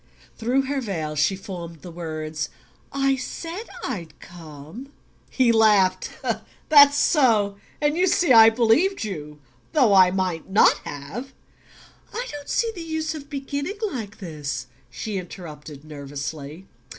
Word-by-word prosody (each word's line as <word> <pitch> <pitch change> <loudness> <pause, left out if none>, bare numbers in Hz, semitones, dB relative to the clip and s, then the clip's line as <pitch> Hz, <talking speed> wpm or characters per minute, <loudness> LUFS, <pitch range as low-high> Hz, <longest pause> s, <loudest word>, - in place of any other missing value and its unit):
Through 250 +4 +1
her 275 0 -2
veil 160 -9 -3
she 150 +6 +2
formed 170 -5 -8
the 175 - -8
words: 155 -2 -4 0.4
"I 275 -1 +1
said 335 - -6 0.2
I'd 180 -11 -5
come." 165 - -11 0.4
He 255 -3 +3
laughed. 205 -5 +4 0.6
"That's 285 -1 +8
so. 225 - +3 0.2
And 295 0 +1
you 365 +2 +3
see 345 -6 +4
I 225 -1 +9
believed 240 - +2
you. 150 -7 -6 0.3
Though 255 -10 +4
I 185 -2 +7
might 185 -2 -2
not 200 - +5
have 165 - -7 0.4
" - - -25
"I 485 +2 -2
don't 290 -1 -8
see 460 -1 +1
the 350 - -8
use 315 -1 -3
of 290 -2 -9
beginning 285 +7 -4
like 215 -6 -6
this," 150 - -5 0.2
she 200 - -4
interrupted 155 -5 -10
nervously. 145 +2 -7
205 Hz, 140 wpm, -24 LUFS, -, 0.6 s, I